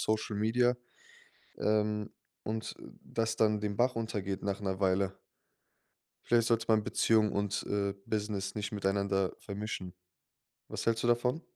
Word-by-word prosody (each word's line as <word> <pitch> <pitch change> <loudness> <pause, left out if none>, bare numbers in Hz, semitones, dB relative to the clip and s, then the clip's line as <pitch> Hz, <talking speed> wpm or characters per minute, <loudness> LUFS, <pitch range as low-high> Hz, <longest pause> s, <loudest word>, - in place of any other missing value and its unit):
Social-Media, 110 +3 +2 0.8
ähm, 105 0 +1 0.3
und, 110 0 -3
äh, - - -11 0.2
das 115 -1 -1
dann 110 -1 +3
den 105 -1 -2
Bach 125 +1 +3
runtergeht 105 -4 -3
nach 100 0 -1
'ner 95 -1 -2
Weile. 95 0 +2 1.1
Vielleicht 115 -1 +3
sollte 115 -1 +2
man 110 -1 +4
Beziehung 110 0 +3
und, 100 0 -1
äh, 100 -1 0
Business 105 -2 -2
nicht 105 -1 -3
miteinander 100 -2 +1
vermischen. 100 -3 -5 0.8
Was - - -4
hältst 115 -1 +2
du - - +3
davon? 125 +6 +2
105 Hz, 135 wpm, -32 LUFS, 100-115 Hz, 1.1 s, man